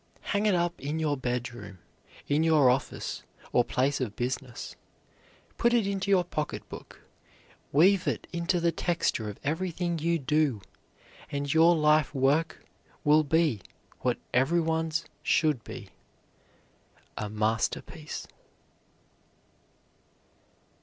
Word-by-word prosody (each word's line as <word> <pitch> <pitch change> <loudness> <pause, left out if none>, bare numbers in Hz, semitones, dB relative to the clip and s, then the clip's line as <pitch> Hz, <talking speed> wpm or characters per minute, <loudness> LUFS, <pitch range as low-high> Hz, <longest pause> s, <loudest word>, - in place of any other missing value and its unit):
Hang 210 0 0
it 200 - +3
up 175 0 0
in 145 +3 -2
your 155 -2 0
bedroom, 120 -6 -4 0.5
in 145 +2 +2
your 155 -6 +5
office 130 +2 -3 0.3
or 120 - +4
place 135 +3 0
of 110 -5 -3
business, 125 0 -4 0.8
put 235 +1 +3
it 230 -4 +3
into 200 0 -2
your 190 -2 +4
pocket 155 -3 -4
book, - - -11 0.7
weave 180 +6 +4
it - - -1
into 170 +1 0
the 170 0 +2
texture 165 - -1
of 105 - -8
everything 170 +2 -1
you 170 +2 +1
do, 150 -4 +1 0.7
and 140 +1 -1
your 165 +2 +6
life 150 -1 +3
work 145 +5 +1 0.4
will 150 +1 +5
be 155 - +2 0.4
what - - 0 0.2
every 135 +8 +3
one's 160 -1 0 0.2
should 150 -8 +2
be - - -9 1.3
A 105 - -4
MASTERPIECE. 110 +2 -2
155 Hz, 120 wpm, -28 LUFS, 130-170 Hz, 1.3 s, your